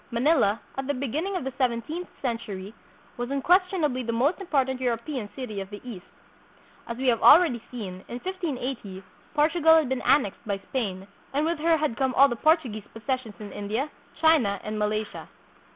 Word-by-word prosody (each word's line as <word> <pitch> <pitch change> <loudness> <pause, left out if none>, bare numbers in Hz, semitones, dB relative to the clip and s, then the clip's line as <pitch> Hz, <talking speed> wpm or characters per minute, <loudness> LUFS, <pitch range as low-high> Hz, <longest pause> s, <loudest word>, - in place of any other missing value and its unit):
Manila, 235 -4 +3 0.2
at 270 - -3
the 285 - 0
beginning 300 - -2
of 360 - -2
the 265 0 -4
seventeenth 255 +8 -1 0.2
century, 220 -5 -4 0.4
was 245 +1 -3
unquestionably 310 -1 +2
the 235 -1 -2
most 275 - +1
important 265 -7 0
Euro 245 -2 +1
pean 235 -3 -5
city 220 -7 -5
of 195 - -7
the 205 0 -8
East. 195 -7 -8 0.8
As 235 - -5
we 265 - -3
have 235 -3 +3
already 310 -9 +7
seen, 190 -7 -7
in 240 - -5
1580 260 - -4 0.3
Portugal 320 +1 +5
had 315 -5 +3
been 265 -1 -1
annexed 260 -9 +2
by 200 -1 0
Spain 195 -3 -4 0.3
and 295 +2 +2
with 335 -1 -1
her 325 +1 +3
had 300 -7 -1
come 265 -2 0
all 275 - +8
the 240 - -2
Portuguese 250 - +1
possessions 235 -1 -3
hi 215 - -8
India, 220 +10 -3 0.3
China, 295 - +4
and 215 0 -4
Malaysia. 210 0 -2
255 Hz, 175 wpm, -26 LUFS, 220-300 Hz, 0.8 s, all